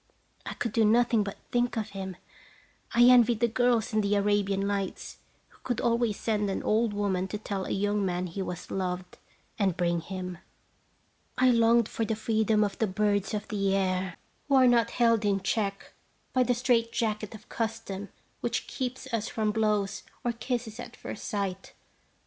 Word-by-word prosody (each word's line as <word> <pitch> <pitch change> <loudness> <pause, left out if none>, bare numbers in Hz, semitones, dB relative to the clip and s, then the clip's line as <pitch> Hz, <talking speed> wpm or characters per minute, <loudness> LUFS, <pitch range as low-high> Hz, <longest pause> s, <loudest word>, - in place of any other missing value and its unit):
I - - -4
could 235 - -2
do 225 +1 +3
nothing 230 +1 +4
but 200 -1 -6
think 245 0 +1
of 220 -1 -3
him. 190 -2 -6 0.8
I 240 - +7
envied 240 -2 +6
the 235 - +3
girls 235 -1 +1
in 215 - +3
the 205 0 +1
"Arabian 200 -1 +1
Nights," 200 -1 -3 0.3
who - - -24
could 245 -3 -1
always 235 -2 +1
send 210 -2 0
an 195 - -2
old 220 +1 +2
woman 195 -2 -1
to 210 - -4
tell 200 -3 -4
a - - -6
young 205 +1 0
man 180 -1 -1
he 180 +2 -5
was 180 -2 -6
loved, 180 -1 -3 0.4
and 190 -4 +1
bring 170 -1 +1
him. 180 0 -6 1.0
I 255 0 +5
longed 230 -1 +4
for 225 - -3
the 220 0 -1
freedom 215 0 +2
of 200 -2 -3
the 220 - +2
birds 205 +1 0
of 210 - -4
the 195 -2 +1
air, 185 -2 -1 0.3
who 280 - +3
are 260 -1 +7
not 235 -1 +4
held 230 -2 +3
in 200 -1 +2
check 200 0 -2 0.4
by 255 - +3
the 245 0 +2
straight 235 -2 +2
jacket 215 -1 -2
of 215 - -14
custom 220 -3 -4 0.3
which - - -2
keeps 255 0 -4
us 230 -1 0
from 215 -1 0
blows 210 -2 0 0.2
or 240 - +1
kisses 235 -1 -4
at 245 0 -8
first - - -7
sight. 195 -4 -3
210 Hz, 180 wpm, -28 LUFS, 195-230 Hz, 1.0 s, I